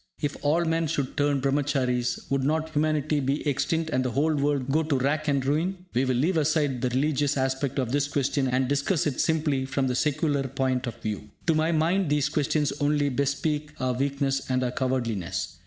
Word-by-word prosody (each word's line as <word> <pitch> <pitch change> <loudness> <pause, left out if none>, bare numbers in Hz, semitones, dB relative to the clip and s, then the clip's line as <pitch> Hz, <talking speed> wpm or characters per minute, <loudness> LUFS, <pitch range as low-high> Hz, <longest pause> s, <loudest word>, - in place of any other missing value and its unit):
If 145 -1 -2
all 160 +4 +2
men 165 0 +1
should 140 -4 -2
turn 145 -2 +1
Brahmacharies, 135 -3 0
would 135 -1 +1
not 160 +3 0
humanity 155 -1 +1
be 140 +3 -1
extinct, 160 +3 0
and 130 - +1
the 130 - -1
whole 145 +6 +1
world 140 -2 0
go 155 +3 +3
to 155 -3 0
rack 150 +4 0
and 140 -2 +1
ruin?" 175 +6 -1
We 125 +2 +2
will 130 -1 +1
leave 160 +8 +1
aside 145 -4 +1
the 125 - +1
religious 145 +2 +1
aspect 135 +1 -1
of 125 -3 -1
this 145 +1 +1
question, 140 -1 0
and 130 0 +1
discuss 145 +5 +1
it 145 -4 0
simply 150 -4 +1
from 135 0 0
the 130 - 0
secular 145 0 0
point 130 0 -1
of 120 - -4
view. 105 -1 -4 0.2
To 165 - +3
my 155 +1 +2
mind, 170 +2 +1
these 145 -1 +2
questions 150 0 0
only 145 0 +2
bespeak 145 +3 -1
our 130 -1 0
weakness 135 +1 -1
and 130 0 +1
our 125 - -1
cowardliness. 105 - -2
140 Hz, 200 wpm, -26 LUFS, 130-155 Hz, 0.2 s, go